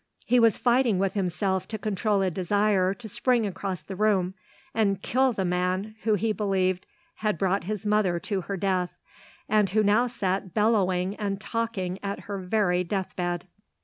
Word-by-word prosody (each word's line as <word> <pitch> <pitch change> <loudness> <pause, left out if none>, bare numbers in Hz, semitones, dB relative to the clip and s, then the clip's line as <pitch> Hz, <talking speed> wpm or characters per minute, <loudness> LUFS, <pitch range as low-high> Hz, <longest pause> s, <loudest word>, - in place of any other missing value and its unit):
He 250 - +4
was 230 -2 +4
fighting 245 -4 +3
with 195 0 0
himself 190 0 -1
to 220 - -4
control 210 -1 0
a 185 - +1
desire 195 +1 +1
to 235 0 -9
spring 240 +2 +1
across 190 -1 -4
the 195 - -7
room 190 -3 +2 0.4
and 200 -4 +1
kill 260 +5 +2
the 195 -5 -2
man 180 +4 -1
who 215 -1 +2
he 215 +2 0
believed 190 -3 0 0.3
had 210 -5 0
brought 195 +2 0
his 210 0 -4
mother 205 -5 +2
to 200 -4 -2
her 195 +2 -4
death 185 -2 -1 0.5
and 210 -2 +3
who 215 +4 +2
now 215 +4 +4
sat 195 -6 -2
bellowing 195 -4 +2
and 200 -2 -2
talking 210 -5 -3
at 200 0 -4
her 200 -1 -5
very 180 -2 +1
death 190 +1 -3
bed. 175 -1 -2
195 Hz, 175 wpm, -26 LUFS, 185-215 Hz, 0.5 s, He